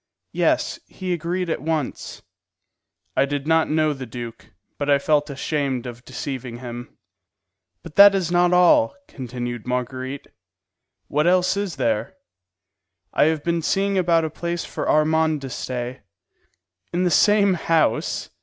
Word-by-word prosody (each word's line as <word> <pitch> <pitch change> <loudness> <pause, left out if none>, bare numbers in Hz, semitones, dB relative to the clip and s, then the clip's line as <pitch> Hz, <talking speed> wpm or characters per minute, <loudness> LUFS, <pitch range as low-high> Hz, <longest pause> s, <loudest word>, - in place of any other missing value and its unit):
"Yes; - - +1
he 185 -2 -4
agreed 175 +2 -2
at 165 - -2
once." 155 -3 -3 0.9
I - - +3
did 140 0 -3
not 160 0 +2
know 155 0 +2
the 135 -2 -8
duke, 120 0 -8 0.3
but 145 0 -2
I 140 - +6
felt 145 +1 +1
ashamed 140 -2 -2
of 120 0 -8
deceiving 130 -2 -5
him. 120 0 -8 0.9
"But 165 -2 -12
that 200 0 +9
is 180 -3 -1
not 175 0 +3
all," 180 - +4
continued 120 -2 -6
Marguerite. 130 +2 -3 0.8
"What 150 - +1
else 185 +1 +3
is 200 -3 -3
there?" 115 -5 -1 1.0
"I - - +4
have 155 -1 0
been 170 -1 0
seeing 195 +4 0
about 170 -3 +3
a 155 - -4
place 170 +1 -3
for - - -4
Armand 155 0 +2
to 135 -2 -7
stay." 125 0 -5 0.9
"In 175 +1 0
the 180 - +2
same 205 +2 +4
house?" 165 -2 0
155 Hz, 145 wpm, -22 LUFS, 130-175 Hz, 1.0 s, that